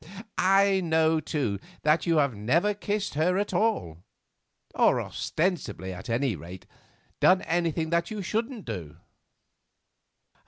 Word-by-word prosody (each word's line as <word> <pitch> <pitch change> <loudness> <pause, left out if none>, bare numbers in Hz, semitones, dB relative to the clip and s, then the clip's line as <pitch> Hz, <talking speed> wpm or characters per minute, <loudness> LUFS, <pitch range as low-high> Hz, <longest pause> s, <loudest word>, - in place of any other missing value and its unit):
I 195 +1 +4
know, 160 -1 +2
too, 135 -10 -2 0.2
that 155 +3 +2
you 165 -1 +3
have 140 -4 +2
never 150 - +1
kissed 205 0 -3
her 165 +5 +1
at 205 +1 -1
all; 150 - 0 0.7
or, - - +3
ostensibly 155 - -2
at 95 +6 -9
any 120 -1 0
rate, 85 +4 -10 0.5
done 185 0 +5
anything 165 -1 -1
that 170 0 +1
you 215 -2 -5
shouldn't 225 +3 -3
do." 90 -10 -6
160 Hz, 125 wpm, -27 LUFS, 115-190 Hz, 0.7 s, done